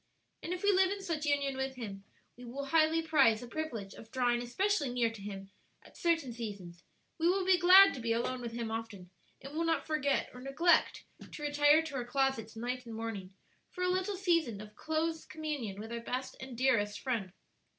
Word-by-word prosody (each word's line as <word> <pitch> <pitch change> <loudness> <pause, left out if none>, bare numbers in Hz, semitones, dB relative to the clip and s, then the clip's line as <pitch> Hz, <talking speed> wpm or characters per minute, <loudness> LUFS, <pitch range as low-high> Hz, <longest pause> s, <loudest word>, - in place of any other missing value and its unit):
"And 335 - -5
if 360 +1 -4
we 405 - +5
live 380 -1 +4
in 395 0 -4
such 310 -4 -2
union 280 -2 +1
with 265 0 -3
Him 200 -5 -7 0.3
we 245 - -13
will 265 +4 -5
highly 320 +2 +3
prize 275 -9 +4
the 245 - -8
privilege 235 -9 -5
of 220 - -13
drawing 245 -1 +1
especially 305 +4 0
near 240 -2 +1
to 225 -3 -11
Him 195 -1 -7 0.3
at - - -18
certain 325 -7 0
seasons; 200 -7 -7 0.4
we 335 +2 +3
will 375 0 +1
be 370 -1 +4
glad 375 +2 +8
to - - -6
be 230 -1 -2
alone 245 +2 -1
with 235 -1 -5
Him 230 -1 -4
often, 210 -5 -6 0.3
and 275 +2 -9
will 325 +2 -1
not 330 -1 0
forget 305 -3 0
or 250 - -10
neglect 280 +7 +2 0.3
to 295 - -8
retire 290 +2 +4
to 315 -3 -7
our 255 -2 -2
closets 265 -4 -1
night 245 +2 -4
and 225 - -7
morning 205 -4 -6 0.3
for 360 - -5
a 360 - +2
little 375 +2 0
season 335 - +1
of 210 0 -11
close 320 +1 -2
communion 290 -11 -5
with 220 +2 -7
our 235 - -3
best 255 +2 -4
and 260 -2 -8
dearest 220 -5 +2
Friend. 230 -8 -2
265 Hz, 205 wpm, -32 LUFS, 230-320 Hz, 0.4 s, glad